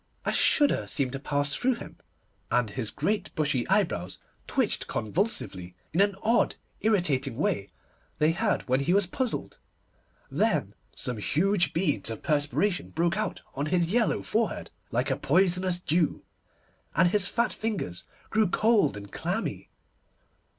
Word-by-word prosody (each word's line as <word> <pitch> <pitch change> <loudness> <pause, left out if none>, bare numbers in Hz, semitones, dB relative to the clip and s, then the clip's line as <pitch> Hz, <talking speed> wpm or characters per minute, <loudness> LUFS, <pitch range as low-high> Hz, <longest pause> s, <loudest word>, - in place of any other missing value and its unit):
A - - +1
shudder 290 -2 +4
seemed 135 -3 0
to 135 - -4
pass 145 0 -1
through 255 0 +1
him, - - -10 0.5
and 120 -4 +1
his 115 -1 -3
great 205 +9 -1
bushy 145 -6 0
eyebrows 140 - +1 0.3
twitched - - 0
convulsively, 105 - -2 0.2
in 175 - +3
an 200 -1 +3
odd, 230 +2 +3 0.2
irritating 150 - +1
way 100 -8 0 0.5
they 155 +1 +3
had 205 +5 0
when 130 +1 +2
he 170 +7 +2
was 200 -1 +4
puzzled. 245 +7 -3 0.7
Then - - +1 0.2
some 125 -2 -2
huge 175 - +1
beads 150 - 0
of 115 - -6
perspiration 150 +6 0
broke 170 +2 0
out 215 -2 -3
on 140 +2 -2
his 175 +1 +1
yellow 235 0 +2
forehead, 220 -4 -1 0.2
like - - 0
a - - +2
poisonous 180 +2 +2
dew, 170 -2 0 0.7
and 175 +3 +5
his 200 0 +3
fat 235 +3 0
fingers 205 - -3 0.3
grew 220 -1 +3
cold 215 - +3
and 100 -1 -9
clammy. - - -3
170 Hz, 145 wpm, -28 LUFS, 135-205 Hz, 0.7 s, and